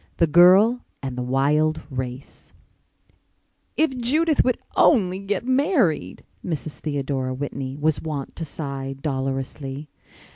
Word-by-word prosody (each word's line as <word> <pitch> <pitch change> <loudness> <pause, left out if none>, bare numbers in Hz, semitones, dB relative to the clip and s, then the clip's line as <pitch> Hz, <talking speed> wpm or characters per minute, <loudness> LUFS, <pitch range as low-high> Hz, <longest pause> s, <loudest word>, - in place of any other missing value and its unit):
The 165 - +4
Girl 185 +9 +6 0.2
and 130 -2 -4
The 125 - -3
Wild 145 +5 +1
RaceToC 130 0 -7 1.2
"If 310 -4 +2
Judith 305 +6 +2
would 250 - +1 0.2
only 190 - +4
get 200 +3 -3
married," 260 - +1 0.2
Mrs. 155 -3 -5
Theodora 135 -3 -2
Whitney 135 -1 -5
was 155 0 0
wont 150 -4 -5
to - - -4
sigh 140 -3 -5
dolorously. 135 0 -4
150 Hz, 115 wpm, -23 LUFS, 135-195 Hz, 1.2 s, Girl